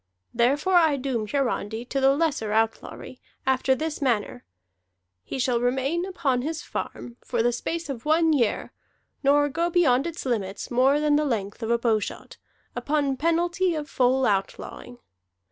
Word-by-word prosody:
Therefore 280 Hz, +10 st, +2 dB
I 320 Hz, -4 st, +4 dB
doom 255 Hz, -5 st, -2 dB
Hiarandi 240 Hz, -4 st, -2 dB
to 275 Hz, -, -1 dB
the 270 Hz, +1 st, +5 dB
lesser 290 Hz, -9 st, 0 dB
outlawry, 225 Hz, +3 st, -2 dB, 0.2 s
after 265 Hz, 0 st, +2 dB
this 310 Hz, +2 st, -4 dB
manner: 225 Hz, -, -1 dB, 0.8 s
he -, -, -5 dB
shall 250 Hz, -2 st, +1 dB
remain 265 Hz, +8 st, 0 dB
upon 285 Hz, -10 st, 0 dB
his 315 Hz, +4 st, -4 dB
farm 240 Hz, 0 st, -6 dB
for 235 Hz, -2 st, -1 dB
the 240 Hz, -, +3 dB
space 335 Hz, +7 st, -3 dB
of 255 Hz, -5 st, -6 dB
one 320 Hz, +1 st, +3 dB
year, 240 Hz, -7 st, 0 dB, 0.5 s
nor 290 Hz, +1 st, +4 dB
go 335 Hz, +4 st, -1 dB
beyond 310 Hz, -6 st, +3 dB
its 335 Hz, -3 st, -6 dB
limits 205 Hz, -6 st, -3 dB
more 265 Hz, +4 st, +3 dB
than 300 Hz, -1 st, +3 dB
the 305 Hz, -, +1 dB
length 210 Hz, -5 st, -3 dB
of 225 Hz, -, -3 dB
a 235 Hz, -, +3 dB
bowshot, 225 Hz, -3 st, -2 dB, 0.4 s
upon 290 Hz, -2 st, 0 dB
penalty 340 Hz, +4 st, +1 dB
of 300 Hz, -1 st, -4 dB
full 260 Hz, -1 st, +2 dB
outlawing. 205 Hz, +4 st, -3 dB
265 Hz, 155 wpm, -25 LUFS, 240-305 Hz, 0.8 s, the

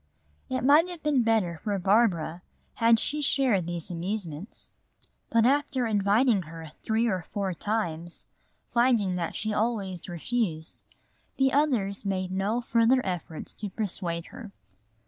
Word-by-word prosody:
It 255 Hz, -, -1 dB
might 300 Hz, +6 st, +5 dB
have 350 Hz, -3 st, -9 dB
been 295 Hz, -4 st, +3 dB
better 215 Hz, -8 st, +1 dB
for 205 Hz, -2 st, 0 dB
Barbara 180 Hz, -4 st, +2 dB, 0.3 s
had 230 Hz, -1 st, +4 dB
she 300 Hz, +5 st, -1 dB
shared 255 Hz, -, +2 dB
these 175 Hz, 0 st, -4 dB
amusements. 175 Hz, 0 st, -5 dB, 0.6 s
But 230 Hz, 0 st, +3 dB
after 275 Hz, -1 st, +2 dB
inviting 210 Hz, +1 st, +3 dB
her 160 Hz, -1 st, -10 dB
three 225 Hz, +1 st, +1 dB
or 190 Hz, -6 st, 0 dB
four 195 Hz, -2 st, -1 dB
times, 175 Hz, -4 st, -3 dB, 0.5 s
finding 235 Hz, -6 st, +3 dB
that 170 Hz, -2 st, -3 dB
she 215 Hz, 0 st, -2 dB
always 205 Hz, -6 st, -2 dB
refused, 175 Hz, -2 st, -3 dB, 0.6 s
the 270 Hz, -1 st, +3 dB
others 240 Hz, -10 st, +1 dB
made 185 Hz, -2 st, -2 dB
no 200 Hz, +5 st, 0 dB
further 235 Hz, +2 st, +3 dB
efforts 175 Hz, -4 st, -4 dB
to 210 Hz, -, -5 dB
persuade 180 Hz, -4 st, -3 dB
her. 240 Hz, -5 st, -9 dB
210 Hz, 135 wpm, -27 LUFS, 180-240 Hz, 0.6 s, might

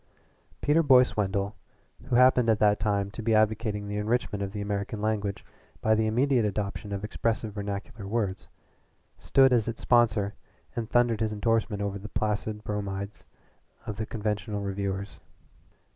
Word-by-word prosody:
Peter 150 Hz, +3 st, +4 dB
Boyce 130 Hz, -5 st, +5 dB
Wendell, 100 Hz, 0 st, -1 dB, 0.5 s
who 125 Hz, -, -1 dB
happened 125 Hz, -1 st, +5 dB
at 110 Hz, -, +4 dB
that 105 Hz, 0 st, +3 dB
time 100 Hz, -1 st, 0 dB
to 115 Hz, -, -7 dB
be 110 Hz, 0 st, +2 dB
advocating 110 Hz, -1 st, +1 dB
the 105 Hz, 0 st, -3 dB
enrichment 105 Hz, -1 st, -1 dB
of 100 Hz, -1 st, -3 dB
the 105 Hz, -, -5 dB
American 100 Hz, +1 st, -3 dB
language 105 Hz, -2 st, -2 dB, 0.3 s
by 110 Hz, -, +2 dB
the 110 Hz, 0 st, +2 dB
immediate 125 Hz, +2 st, +2 dB
adoption 100 Hz, 0 st, -3 dB
of 100 Hz, 0 st, -3 dB
expressive 110 Hz, 0 st, -2 dB
vernacular 100 Hz, 0 st, -5 dB
words, 100 Hz, -3 st, -2 dB, 0.7 s
stood 135 Hz, -1 st, +4 dB
as 115 Hz, -3 st, +2 dB
its 115 Hz, 0 st, -4 dB
sponsor 110 Hz, -4 st, +3 dB, 0.4 s
and 115 Hz, -2 st, -3 dB
thundered 120 Hz, -2 st, +3 dB
his 110 Hz, -1 st, 0 dB
indorsement 105 Hz, -1 st, 0 dB
over 100 Hz, 0 st, -3 dB
the 105 Hz, +2 st, -8 dB
placid 105 Hz, 0 st, -2 dB
bromides 100 Hz, -1 st, -4 dB, 0.6 s
of 105 Hz, -, -5 dB
the 110 Hz, -, -3 dB
conventional 105 Hz, -1 st, -2 dB
reviewers. 100 Hz, 0 st, -3 dB
105 Hz, 155 wpm, -28 LUFS, 100-115 Hz, 0.7 s, Boyce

